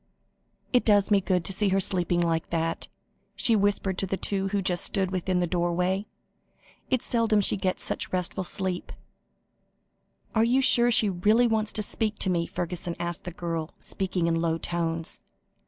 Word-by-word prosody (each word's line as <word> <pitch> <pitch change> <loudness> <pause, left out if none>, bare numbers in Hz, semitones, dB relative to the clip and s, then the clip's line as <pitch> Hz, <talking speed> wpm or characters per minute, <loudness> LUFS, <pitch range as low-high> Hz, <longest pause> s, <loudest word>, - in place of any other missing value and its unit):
"It 250 - +4
does 205 -2 +3
me 200 -1 +5
good 180 -3 0
to 195 - -2
see 200 +1 +1
her 195 +1 +2
sleeping 175 -2 +1
like 165 -1 -1
that," 165 0 -2 0.5
she 230 - +3
whispered 200 -2 0
to 195 - -1
the 195 - -2
two 195 0 -1
who 200 +1 -1
stood - - -21
just 185 +1 +2
within 185 -1 0
the - - +2
doorway; 180 +3 -1 0.8
"it's 255 -3 0
seldom 230 -3 +2
she 200 - +1
gets 190 -1 -1
such - - -3
restful 185 +1 0
sleep." 185 0 -3 1.4
"You 230 +3 +3
are - - +3
sure 240 -1 +5
she 225 -3 +4
really 210 +6 +3
wants 220 -2 +1
to 215 - -1
speak 215 +1 -2
to 190 - +1
me?" 170 -1 0
Fergusson 175 0 -4
asked 175 -1 -4
the 175 - -5
girl, 165 -2 -4
speaking 185 -3 -2
in 165 0 +1
low 165 -1 0
tones. 165 -1 -2
185 Hz, 175 wpm, -26 LUFS, 175-205 Hz, 1.4 s, me